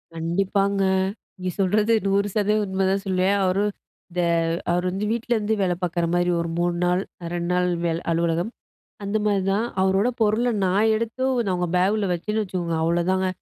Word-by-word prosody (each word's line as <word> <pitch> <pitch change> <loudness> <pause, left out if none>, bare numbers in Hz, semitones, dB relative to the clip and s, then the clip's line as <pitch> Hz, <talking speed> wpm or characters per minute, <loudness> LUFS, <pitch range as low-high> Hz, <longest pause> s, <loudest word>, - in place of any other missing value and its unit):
கண்டிப்பாங்க. 195 +4 0 0.5
நீங்க 185 -1 -4
சொல்றது 210 +4 +2
100% 205 +2 +1
உண்மைதான் 190 +1 0
சொல்லுவேன். 190 +2 +2
அவரு 190 +2 +1 0.5
இந்த 180 0 -1 0.5
அவர் 180 +1 0
வந்து 195 +3 -2
வீட்டிலேருந்து 225 -2 0
வேலை 180 -2 +1
பார்க்குற 175 -1 0
மாரி 175 0 +2
ஒரு 170 0 -2
3 175 0 +1
நாள் 180 +1 +2 0.3
2 170 0 -2
நாள் 180 0 +2 0.2
வேலை 165 0 -1
அலுவலகம். 170 +4 0 0.6
அந்த 205 +2 0
மாரி 200 -2 +2
தான். 220 +4 +1 0.2
அவரோட 190 +5 +2
பொருளை 225 +3 +2
நான் 205 +4 +3
எடுத்து 230 +3 -3 0.2
நான் 190 - 0
அவங்க 175 -1 -1
பேக்கில 195 +1 +2
வச்சேன்னு 210 +5 -1
வச்சுக்கோங்க, 175 -4 -3
அவ்வளோதாங்க. 180 +3 +1
190 Hz, 150 wpm, -23 LUFS, 175-210 Hz, 0.6 s, நான்